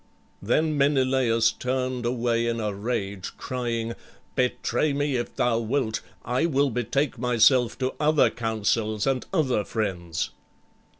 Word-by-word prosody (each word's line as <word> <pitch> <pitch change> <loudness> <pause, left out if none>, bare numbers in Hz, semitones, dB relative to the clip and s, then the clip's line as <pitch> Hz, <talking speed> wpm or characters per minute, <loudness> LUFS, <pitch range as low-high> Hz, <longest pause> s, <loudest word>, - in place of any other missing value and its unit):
Then 155 +9 +1
Menelaüs 130 -5 +3
turned 130 -1 -1
away 120 -1 0
in 115 0 -1
a 105 -2 -2
rage, 100 -3 -4
crying, 115 -2 -3 0.4
"Betray 125 +3 0
me 145 -1 0
if 120 -1 -3
thou 115 -2 +2
wilt. 115 0 -1 0.2
I 125 +7 +1
will 140 -3 +2
betake 125 +3 -1
myself 125 0 +4
to 130 0 -1
other 150 0 +4
counsels 110 -1 -1
and 135 -2 +1
other 135 - +1
friends." 90 -8 -3
120 Hz, 125 wpm, -25 LUFS, 115-130 Hz, 0.4 s, myself